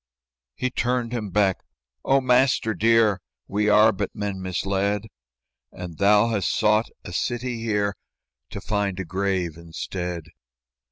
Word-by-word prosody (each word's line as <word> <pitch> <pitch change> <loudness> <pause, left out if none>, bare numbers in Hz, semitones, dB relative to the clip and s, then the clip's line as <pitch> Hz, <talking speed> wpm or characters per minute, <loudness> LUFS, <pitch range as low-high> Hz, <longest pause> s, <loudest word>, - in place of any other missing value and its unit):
He 130 - -2
turned 125 -1 -1
him 110 -4 -3
back; 95 -1 +2 0.4
"O 135 0 +3
master 125 -3 +3
dear, 110 -1 +3 0.3
We 105 +1 +1
are 105 +1 +6
but 95 - -4
men 100 -2 -3
misled; 100 +2 -1 0.7
And 90 -3 -8
thou 105 +3 +5
hast 105 -6 0
sought 105 +1 +2
a 85 - -8
city 120 +4 -2
here 105 -3 0 0.5
To - - -6
find 100 -3 -1
a 95 - -3
grave 95 -3 -1
instead." 85 +1 -5
105 Hz, 130 wpm, -24 LUFS, 95-115 Hz, 0.7 s, are